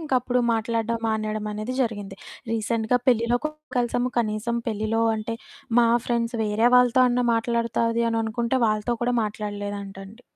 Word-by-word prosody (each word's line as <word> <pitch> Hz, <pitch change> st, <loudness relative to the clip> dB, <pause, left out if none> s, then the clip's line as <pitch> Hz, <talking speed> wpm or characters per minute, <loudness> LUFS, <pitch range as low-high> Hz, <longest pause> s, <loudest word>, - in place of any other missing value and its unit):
ఇంకప్పుడు 255 Hz, -5 st, 0 dB
మాట్లాడడం 230 Hz, +1 st, -1 dB
మానేయడమనేది 215 Hz, +1 st, -2 dB
జరిగింది. 205 Hz, -5 st, -4 dB, 0.4 s
రీసెంట్‌గా 225 Hz, +2 st, 0 dB
పెళ్ళిలో 240 Hz, -1 st, +3 dB
కూడా 305 Hz, 0 st, -3 dB, 0.2 s
కలిసాము. 245 Hz, +1 st, 0 dB
కనీసం 230 Hz, +1 st, -1 dB
పెళ్ళిలో 220 Hz, +1 st, -1 dB
అంటే, 220 Hz, +1 st, -4 dB, 0.5 s
మా 235 Hz, -, +4 dB, 0.2 s
ఫ్రెండ్స్ 235 Hz, -1 st, -1 dB
వేరే 215 Hz, +3 st, +2 dB
వాళ్ళతో 250 Hz, +1 st, +5 dB
అన్నా 245 Hz, 0 st, +1 dB
మాట్లాడతాది 230 Hz, 0 st, 0 dB
అననుకుంటే 230 Hz, +2 st, 0 dB
వాళ్ళతో 215 Hz, +2 st, 0 dB
కూడా 245 Hz, +1 st, +1 dB
మాట్లాడలేదంటండి 205 Hz, 0 st, -6 dB
230 Hz, 120 wpm, -24 LUFS, 215-240 Hz, 0.5 s, వాళ్ళతో